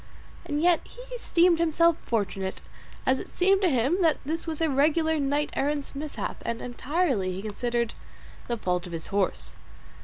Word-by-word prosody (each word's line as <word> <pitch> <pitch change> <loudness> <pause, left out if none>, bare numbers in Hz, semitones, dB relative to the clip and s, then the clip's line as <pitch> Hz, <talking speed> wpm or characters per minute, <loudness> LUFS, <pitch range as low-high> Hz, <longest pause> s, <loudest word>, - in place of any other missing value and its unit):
And 300 -2 -1
yet 350 -1 +4
he - - -16
esteemed 350 -8 +3
himself 335 0 +4
fortunate, 195 -4 -2 0.4
as 260 0 +3
it - - -8
seemed 390 +2 +3
to 370 - +4
him 270 +7 +2
that 320 -4 +4
this 325 +4 -3
was 315 -2 -3
a 325 - +2
regular 315 +3 +2
knight 285 +1 0
errant's 285 0 -1
mishap, 290 +1 -5
and 235 0 -2
entirely, 245 - 0
he 190 +2 -6
considered, 235 +2 -1 0.5
the 235 - -1
fault 180 -3 -1
of 175 - -9
his 165 -1 -3
horse. 200 -2 -1
290 Hz, 165 wpm, -27 LUFS, 230-330 Hz, 0.5 s, yet